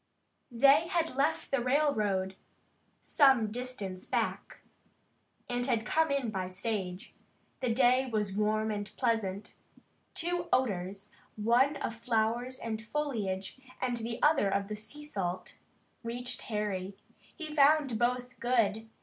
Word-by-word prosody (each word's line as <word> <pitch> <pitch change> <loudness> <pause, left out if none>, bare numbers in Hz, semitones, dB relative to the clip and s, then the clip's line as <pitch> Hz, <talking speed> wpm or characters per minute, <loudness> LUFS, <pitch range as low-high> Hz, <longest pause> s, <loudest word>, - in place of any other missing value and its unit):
They 275 +6 +5
had 335 -3 0
left 290 +4 0
the 275 -2 +2
railroad 215 -9 +1 0.7
some 265 -7 +4
distance 215 -6 -5
back, - - -2 0.9
and 245 0 -1
had 230 -3 +1
come 320 0 +2
in 275 -5 0
by 190 -3 -2
stage. 190 -1 -4 0.5
The 250 - 0
day 255 +2 +4
was 210 -4 -1
warm 215 +1 +1
and 205 -1 -4
pleasant. 215 -5 -1 0.6
Two 345 +1 -1
odors, 195 -6 0 0.2
one 240 +7 +3
of 230 -4 -4
flowers 235 +2 0
and 220 -1 -4
foliage, 225 -7 -3 0.2
and 245 -2 -1
the 230 0 -4
other 295 -9 +4
of 200 +1 -1
the 210 - -3
salt 210 -7 -5
sea, - - -15 0.5
reached 245 +2 -4
Harry. 200 -3 -2 0.4
He 310 -3 -6
found 285 -5 +4
both 250 +1 -1
good. 225 -3 +1
230 Hz, 125 wpm, -31 LUFS, 210-265 Hz, 0.9 s, They